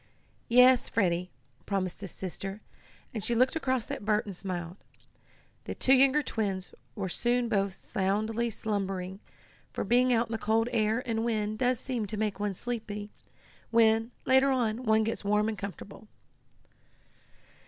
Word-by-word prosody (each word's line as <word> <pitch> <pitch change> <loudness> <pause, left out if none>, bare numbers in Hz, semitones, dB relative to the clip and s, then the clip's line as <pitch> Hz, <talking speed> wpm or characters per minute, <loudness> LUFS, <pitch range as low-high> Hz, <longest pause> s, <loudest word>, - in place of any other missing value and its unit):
"Yes, 250 +1 +6
Freddie," 180 -3 +1 0.4
promised 195 -2 -2
his 195 - -5
sister, 195 +3 -6 0.5
and 220 -4 -4
she 235 +2 0
looked 255 +5 +3
across 260 -7 -1
at - - -5
Bert 210 0 +1
and 200 -3 -7
smiled. 175 -1 -5 0.9
The - - -5
two 265 - +4
younger 275 +2 +5
twins 195 -6 -3 0.2
were 195 -3 -3
soon 240 +6 +1
both 200 -3 +1
soundly 215 +5 -1
slumbering, 195 -3 -3 0.5
for - - -3
being 250 +1 +3
out 235 0 +2
in - - -8
the 225 - -2
cold 225 +2 +1
air 220 +2 +1
and 225 -2 -1
wind 215 -2 -1
does 250 -1 +2
seem 240 -6 -3
to 215 - -5
make 210 -2 -1
one 205 -1 -1
sleepy 210 -2 -5 0.6
when, 225 0 +4 0.2
later 265 +1 +5
on, 245 -2 0
one 220 0 +4
gets 225 0 -2
warm 210 +1 +2
and 220 - -1
comfortable. 200 +2 -8
220 Hz, 155 wpm, -29 LUFS, 200-235 Hz, 0.9 s, Yes